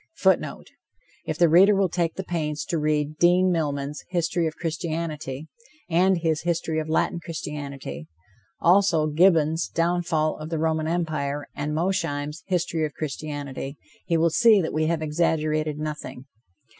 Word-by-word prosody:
[Footnote: - - 0 0.6
If - - -2
the 170 - +5
reader 190 +6 +6
will 195 -1 +3
take 170 -1 -1
the 190 - -4
pains 155 -4 -3
to 165 - -1
read 150 0 0
Dean 180 +2 +4
Milman's 145 -3 -2
History 175 -1 0
of 155 - -5
Christianity, 160 -3 -4 0.4
and 185 +3 +4
his 160 -2 0
History 165 -2 -1
of 155 0 -4
Latin 160 +1 +1
Christianity; 145 - -6 0.5
also 175 -3 +4
Gibbon's 160 0 +3
Downfall 165 -2 0
of 155 +1 -6
the 165 - -2
Roman 160 0 0
Empire, 155 -4 -2
and 150 +1 -3
Mosheim's 165 -3 -1
History 170 -3 0
of 150 -2 -3
Christianity, 145 -2 -5 0.3
he 165 - +2
will 165 0 +3
see 225 +2 +6
that 165 - -2
we 155 0 +1
have 165 -1 0
exaggerated 155 -1 0
nothing. 150 -4 -6
160 Hz, 145 wpm, -25 LUFS, 150-170 Hz, 0.6 s, reader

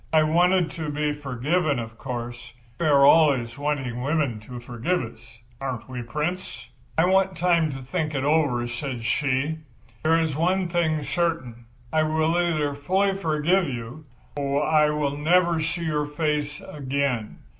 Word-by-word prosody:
I 155 -1 +5
wanted 175 +3 +3
to 160 -2 -4
be 150 0 -1
forgiven, 145 +3 0
of 115 -1 -5
course—we 120 +2 -6
are 140 -2 +6
always 140 -7 +4
wanting 135 -5 -2
women 140 -5 0
to 125 -1 -7
forgive 120 +9 -1
us, 115 0 -12 0.2
aren't 130 -4 -4
we, 125 -1 -5
Prince?" 150 +10 -4 0.3
"'I 160 - +5
want 190 0 +2
time 170 -3 +3
to 135 - -5
think 150 +4 -3
it 135 - -1
over,' 140 -5 +2
said 120 0 -5
she. 140 +5 0 0.4
'There 160 +1 +3
is 160 -3 0
one 180 +4 +1
thing 160 -3 +1
certain; 135 -6 -2 0.3
I 155 - +4
will 155 +1 +1
either 160 -5 +1
fully 190 +7 +1
forgive 170 +1 +1
you, 125 +4 -6 0.3
or 140 +1 0
I 155 -1 +4
will 150 -2 -1
never 170 +2 +3
see 165 +2 -2
your 150 -2 0
face 150 -1 -1
again. 135 -5 -2
150 Hz, 155 wpm, -25 LUFS, 130-165 Hz, 0.4 s, are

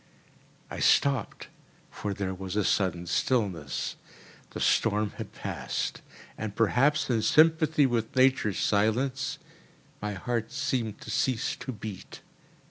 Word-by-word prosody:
I - - -5
stopped, 135 -5 +2 0.4
for 100 -1 -4
there 95 -1 -2
was 95 0 -6
a 105 - +2
sudden 90 -3 +1
stillness. 85 - -1 0.5
The - - -7
storm 105 -1 +2
had - - -6
passed; - - -4 0.4
and, 105 -2 -4
perhaps 140 +7 +3
in 115 -2 +2
sympathy 155 +4 +4
with 120 -2 -1
nature's 130 -6 +3
silence, 130 +6 +1 0.6
my 105 0 -2
heart 115 +4 -2
seemed 120 -4 -2
to - - -7
cease 125 -3 0
to 125 +1 -5
beat. 105 -4 -8
110 Hz, 125 wpm, -28 LUFS, 100-130 Hz, 0.6 s, sympathy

